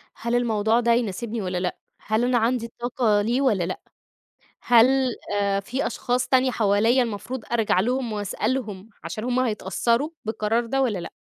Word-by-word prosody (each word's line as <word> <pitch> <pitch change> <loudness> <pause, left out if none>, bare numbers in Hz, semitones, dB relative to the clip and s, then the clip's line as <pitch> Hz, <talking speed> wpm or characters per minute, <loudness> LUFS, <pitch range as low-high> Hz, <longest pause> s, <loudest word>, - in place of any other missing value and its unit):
"هل 235 +1 -2
الموضوع 225 -1 +2
ده 235 -1 +2
يناسبني 230 0 -2
والّا 185 -2 -3
لأ؟ 180 - -2 0.2
هل 220 +2 0
أنا 250 0 +2
عَندي 230 +1 +1
الطاقة 235 -3 0
ليه 240 +5 0
والّا 215 -10 +2
لأ؟ 180 +2 -4 0.8
هل 240 0 +6 0.5
آآ 200 -1 +1
فيه 250 +7 -3
أشخاص 250 +1 -1
تانية 260 0 +3
حواليَّ 225 +3 +3
المفروض 235 +2 -5
أرجَع 225 -5 +2
لهم 245 +2 -1
وأسألهم 210 0 -3
عشان 170 +7 -5
هُم 250 0 0
هيتأثروا، 235 - 0
بالقرار 220 +2 -1
ده 270 +3 0
والّا 215 -7 0
لأ؟" 170 - -7
230 Hz, 160 wpm, -24 LUFS, 205-245 Hz, 0.8 s, هل